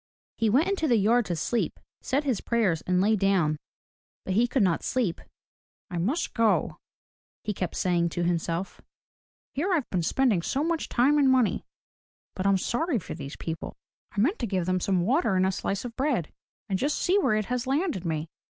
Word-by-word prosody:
He 225 Hz, -, +3 dB
went 275 Hz, -, +3 dB
into 390 Hz, -5 st, 0 dB
the 240 Hz, -4 st, +4 dB
yard 225 Hz, +3 st, +3 dB
to 175 Hz, -, -1 dB
sleep, 230 Hz, +8 st, -1 dB, 0.2 s
said 275 Hz, +3 st, 0 dB
his 260 Hz, -7 st, 0 dB
prayers 210 Hz, -9 st, +1 dB
and 180 Hz, 0 st, +2 dB
lay 215 Hz, +3 st, +3 dB
down. 190 Hz, -6 st, +2 dB, 0.7 s
But 190 Hz, -, -1 dB
he 230 Hz, +5 st, +3 dB
could 250 Hz, -2 st, +2 dB
not 175 Hz, -4 st, +2 dB
sleep. 230 Hz, -10 st, -1 dB, 0.7 s
"I 175 Hz, -, -2 dB
must 255 Hz, -, -1 dB
go," 230 Hz, -2 st, +2 dB, 0.7 s
he 210 Hz, -, -2 dB
kept 180 Hz, -3 st, -3 dB
saying 175 Hz, -2 st, +1 dB
to 175 Hz, +1 st, -2 dB
himself. 170 Hz, +1 st, -2 dB, 0.7 s
"Here 340 Hz, +8 st, -1 dB
I've 315 Hz, -8 st, +1 dB
been 180 Hz, -, +1 dB
spending 220 Hz, +1 st, +2 dB
so 275 Hz, -, -1 dB
much 330 Hz, 0 st, -1 dB
time 280 Hz, +5 st, +3 dB
and 275 Hz, -2 st, +5 dB
money 255 Hz, -4 st, +2 dB, 0.3 s
— -, -, -64 dB
but 190 Hz, +1 st, -1 dB
I'm 195 Hz, -1 st, +4 dB
sorry 265 Hz, -, 0 dB
for 195 Hz, -, -6 dB
these 140 Hz, +2 st, -7 dB
people. 165 Hz, 0 st, -5 dB, 0.4 s
I 205 Hz, -, -4 dB
meant 295 Hz, -, +2 dB
to 235 Hz, -, -1 dB
give 185 Hz, -3 st, -1 dB
them 185 Hz, +1 st, +1 dB
some 185 Hz, 0 st, +1 dB
water 230 Hz, -, +2 dB
and 185 Hz, 0 st, +3 dB
a 190 Hz, -, +2 dB
slice 195 Hz, +3 st, -3 dB
of 235 Hz, -1 st, -7 dB
bread, 260 Hz, -, -1 dB, 0.3 s
and 190 Hz, -2 st, -1 dB
just 290 Hz, +3 st, 0 dB
see 375 Hz, +3 st, +2 dB
where 215 Hz, -, +2 dB
it 215 Hz, -1 st, 0 dB
has 250 Hz, +2 st, -2 dB
landed 290 Hz, -, 0 dB
me. 160 Hz, -2 st, -2 dB
215 Hz, 200 wpm, -27 LUFS, 180-265 Hz, 0.7 s, and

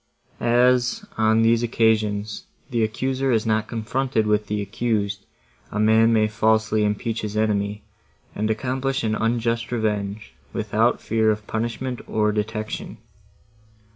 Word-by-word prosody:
As, 125 Hz, -, +2 dB
on 110 Hz, 0 st, +3 dB
these 115 Hz, 0 st, +4 dB
occasions, 110 Hz, -3 st, 0 dB, 0.3 s
the 115 Hz, -2 st, +1 dB
accuser 130 Hz, +4 st, -1 dB
is 110 Hz, -2 st, +1 dB
not 110 Hz, -1 st, +1 dB
confronted 120 Hz, 0 st, -1 dB
with 105 Hz, 0 st, +1 dB
the 105 Hz, 0 st, -1 dB
accused, 100 Hz, -1 st, -2 dB, 0.4 s
a 105 Hz, -, -3 dB
man 110 Hz, +1 st, +5 dB
may 110 Hz, -1 st, +3 dB
falsely 110 Hz, 0 st, +2 dB
impeach 105 Hz, +2 st, -1 dB
his 105 Hz, 0 st, -4 dB
enemy, 105 Hz, -1 st, 0 dB, 0.5 s
and 110 Hz, +1 st, -1 dB
accomplish 130 Hz, +4 st, -1 dB
an 110 Hz, -1 st, 0 dB
unjust 115 Hz, +1 st, 0 dB
revenge, 105 Hz, -3 st, -2 dB, 0.2 s
without -, -, +1 dB
fear 110 Hz, 0 st, +2 dB
of 105 Hz, -1 st, -1 dB
punishment, 120 Hz, +3 st, -3 dB
or 105 Hz, -1 st, +1 dB
detection. 110 Hz, +1 st, -4 dB
110 Hz, 130 wpm, -23 LUFS, 105-115 Hz, 0.5 s, man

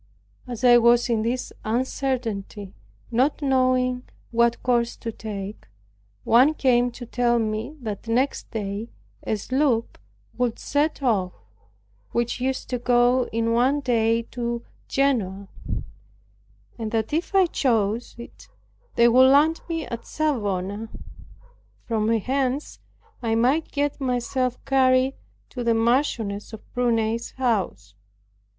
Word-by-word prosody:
As 240 Hz, -1 st, -6 dB
I 240 Hz, -1 st, +7 dB
was 240 Hz, +1 st, +4 dB
in 225 Hz, -2 st, +1 dB
this 240 Hz, +3 st, -2 dB
uncertainty, 225 Hz, -5 st, -2 dB, 0.4 s
not 260 Hz, +5 st, +2 dB
knowing 255 Hz, -2 st, +1 dB, 0.2 s
what 235 Hz, 0 st, +2 dB
course 240 Hz, -1 st, +1 dB
to 230 Hz, -, -5 dB
take, 205 Hz, -2 st, -7 dB, 0.6 s
one 260 Hz, +7 st, +5 dB
came 245 Hz, -3 st, +3 dB
to 245 Hz, -, -8 dB
tell 240 Hz, 0 st, +1 dB
me 220 Hz, +5 st, -2 dB
that 215 Hz, -1 st, -6 dB
next 250 Hz, +5 st, 0 dB
day 210 Hz, 0 st, -4 dB, 0.3 s
a 220 Hz, -, -1 dB
sloop 255 Hz, +1 st, 0 dB, 0.4 s
would 245 Hz, -2 st, 0 dB
set 290 Hz, 0 st, -1 dB
off, 195 Hz, -8 st, +1 dB, 0.8 s
which 235 Hz, +1 st, -1 dB
used 265 Hz, +1 st, -2 dB
to 250 Hz, -, -1 dB
go 245 Hz, +1 st, +3 dB
in 230 Hz, 0 st, 0 dB
one 255 Hz, +5 st, +3 dB
day 230 Hz, -3 st, +2 dB
to 235 Hz, -1 st, -3 dB, 0.2 s
Genoa; 205 Hz, -9 st, 0 dB, 1.3 s
and 220 Hz, -1 st, -3 dB
that 220 Hz, +3 st, -2 dB
if 340 Hz, +5 st, -1 dB
I 380 Hz, -1 st, +6 dB
chose 230 Hz, -, 0 dB
it, 235 Hz, -, -12 dB, 0.5 s
they 235 Hz, -, +6 dB
would 255 Hz, +2 st, +6 dB
land 300 Hz, +4 st, +4 dB
me 325 Hz, -2 st, -2 dB
at 235 Hz, -1 st, -7 dB
Savona, 210 Hz, -8 st, -2 dB, 1.0 s
from 220 Hz, -2 st, 0 dB
whence 260 Hz, +5 st, -1 dB, 0.4 s
I 225 Hz, -2 st, 0 dB
might 260 Hz, +8 st, +2 dB
get 290 Hz, 0 st, -1 dB
myself 250 Hz, 0 st, -1 dB
carried 260 Hz, 0 st, +3 dB, 0.4 s
to 245 Hz, -, -4 dB
the 230 Hz, -1 st, +2 dB
Marchioness 225 Hz, -3 st, 0 dB
of 220 Hz, -, -12 dB
Prunai's 230 Hz, -2 st, 0 dB
house. 195 Hz, -, -1 dB
240 Hz, 125 wpm, -24 LUFS, 225-260 Hz, 1.3 s, I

